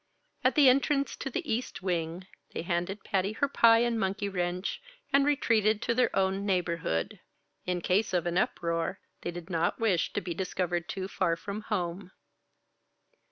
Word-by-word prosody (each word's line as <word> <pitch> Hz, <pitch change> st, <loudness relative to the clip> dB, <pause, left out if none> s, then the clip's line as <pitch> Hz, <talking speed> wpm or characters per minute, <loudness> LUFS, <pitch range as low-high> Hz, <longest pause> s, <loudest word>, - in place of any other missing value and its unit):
At -, -, +3 dB
the 295 Hz, -4 st, +7 dB
entrance 275 Hz, +2 st, +3 dB
to 270 Hz, -, -4 dB
the 330 Hz, +5 st, -4 dB
East 225 Hz, -5 st, -3 dB
Wing, 175 Hz, -1 st, -2 dB, 0.3 s
they -, -, -2 dB
handed 175 Hz, +3 st, -2 dB
Patty 195 Hz, +2 st, 0 dB
her 280 Hz, -, +1 dB
pie 230 Hz, -4 st, +5 dB
and 235 Hz, -1 st, 0 dB
monkey 195 Hz, 0 st, -1 dB
wrench, 180 Hz, -1 st, -2 dB, 0.3 s
and 275 Hz, 0 st, +5 dB
retreated 220 Hz, -7 st, +3 dB
to 235 Hz, -, +1 dB
their 250 Hz, +1 st, +3 dB
own 195 Hz, +1 st, +1 dB
neighborhood. 170 Hz, -, -1 dB, 0.5 s
In 180 Hz, -1 st, 0 dB
case 195 Hz, +5 st, +1 dB
of 180 Hz, -2 st, +1 dB
an 175 Hz, 0 st, -1 dB
uproar, 170 Hz, 0 st, 0 dB, 0.2 s
they -, -, -3 dB
did 175 Hz, +1 st, -7 dB
not 165 Hz, -1 st, 0 dB
wish 205 Hz, -7 st, +1 dB
to -, -, 0 dB
be 175 Hz, -1 st, -4 dB
discovered 175 Hz, -1 st, -2 dB
too 190 Hz, -1 st, -3 dB
far 185 Hz, -4 st, 0 dB
from 200 Hz, +5 st, -6 dB
home. 180 Hz, -2 st, -2 dB
190 Hz, 165 wpm, -29 LUFS, 175-220 Hz, 0.5 s, the